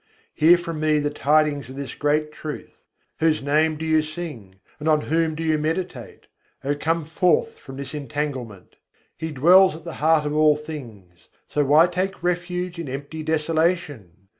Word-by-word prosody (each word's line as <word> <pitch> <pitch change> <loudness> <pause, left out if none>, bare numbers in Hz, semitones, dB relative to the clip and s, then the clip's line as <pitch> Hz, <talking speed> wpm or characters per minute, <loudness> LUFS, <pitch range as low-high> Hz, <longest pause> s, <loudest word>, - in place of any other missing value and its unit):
Hear 165 +3 +6
from 165 -2 -5
me 155 0 +2
the 145 0 -1
tidings 150 -2 +1
of 130 - -9
this 140 -1 -6
great 150 +1 0
truth! 150 0 -9 0.3
Whose 160 -3 +2
name 155 +2 +2
do 160 - -5
you 155 -1 +3
sing, 155 - -8 0.2
and 155 +2 -1
on 155 -1 +3
whom 160 +1 0
do 165 - -4
you 155 -1 +1
meditate? 160 - -4 0.4
O, 140 +1 0
come 160 +2 -1
forth 165 +1 +1
from 135 -1 -11
this 140 0 -6
entanglement! 140 -8 -5 0.4
He 160 - -5
dwells 175 +5 +5
at 160 - -11
the 170 -1 -7
heart 155 -1 +3
of 150 0 -2
all 155 -1 +5
things, 115 - -10 0.2
so 150 - 0
why 150 +4 +6
take 180 +1 -3
refuge 180 0 -2
in 160 -5 -5
empty 140 +4 -6
desolation? 155 - -1
155 Hz, 170 wpm, -23 LUFS, 145-165 Hz, 0.4 s, Hear